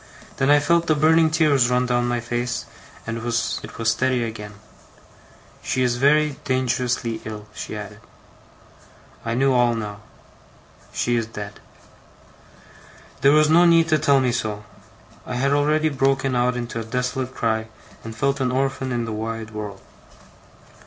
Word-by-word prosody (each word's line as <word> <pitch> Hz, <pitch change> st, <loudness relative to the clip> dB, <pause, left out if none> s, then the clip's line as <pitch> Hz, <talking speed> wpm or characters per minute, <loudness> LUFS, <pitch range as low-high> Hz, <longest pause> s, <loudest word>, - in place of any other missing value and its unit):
Then 135 Hz, 0 st, +1 dB
I 145 Hz, 0 st, +6 dB
felt 170 Hz, +3 st, +2 dB
the 155 Hz, -, +3 dB
burning 160 Hz, +2 st, +4 dB
tears 145 Hz, -6 st, +3 dB
run 125 Hz, 0 st, +2 dB
down 120 Hz, -1 st, +1 dB
my 120 Hz, 0 st, 0 dB
face, 120 Hz, +1 st, -3 dB, 0.4 s
and 115 Hz, 0 st, -3 dB
it 115 Hz, -, -7 dB
was 120 Hz, -1 st, -1 dB, 0.2 s
steady 125 Hz, +2 st, +1 dB
again. 105 Hz, -2 st, -6 dB, 1.1 s
'She 130 Hz, -, -1 dB
is 120 Hz, -1 st, +1 dB
very 150 Hz, +2 st, +3 dB
dangerously 125 Hz, -3 st, -1 dB
ill,' 105 Hz, -1 st, -7 dB
she -, -, -6 dB
added. -, -, -8 dB, 1.2 s
I 115 Hz, 0 st, -2 dB
knew 135 Hz, +2 st, +3 dB
all 120 Hz, -1 st, +3 dB
now. 105 Hz, -2 st, -5 dB, 0.9 s
'She 120 Hz, 0 st, 0 dB
is 115 Hz, -1 st, -1 dB
dead.' 105 Hz, -2 st, -8 dB, 1.6 s
There 135 Hz, +2 st, +6 dB
was 155 Hz, +1 st, +5 dB
no 170 Hz, +2 st, +6 dB
need 165 Hz, -1 st, +5 dB
to 155 Hz, -1 st, +3 dB
tell 140 Hz, -1 st, +4 dB
me 130 Hz, -2 st, +1 dB
so. 110 Hz, -3 st, -3 dB, 0.6 s
I 125 Hz, -, -4 dB
had 135 Hz, +3 st, +1 dB
already 150 Hz, +2 st, +2 dB
broken 135 Hz, -1 st, +1 dB
out 125 Hz, 0 st, +1 dB
into 120 Hz, -1 st, -4 dB
a -, -, -4 dB
desolate 125 Hz, +2 st, -3 dB
cry, 110 Hz, -1 st, -1 dB, 0.4 s
and 115 Hz, -1 st, -8 dB
felt 140 Hz, +4 st, 0 dB
an 130 Hz, -1 st, +1 dB
orphan 135 Hz, 0 st, -1 dB
in 120 Hz, -1 st, -1 dB
the 115 Hz, -, -4 dB
wide 110 Hz, 0 st, -5 dB
world. 105 Hz, -2 st, -7 dB
125 Hz, 155 wpm, -22 LUFS, 115-140 Hz, 1.6 s, I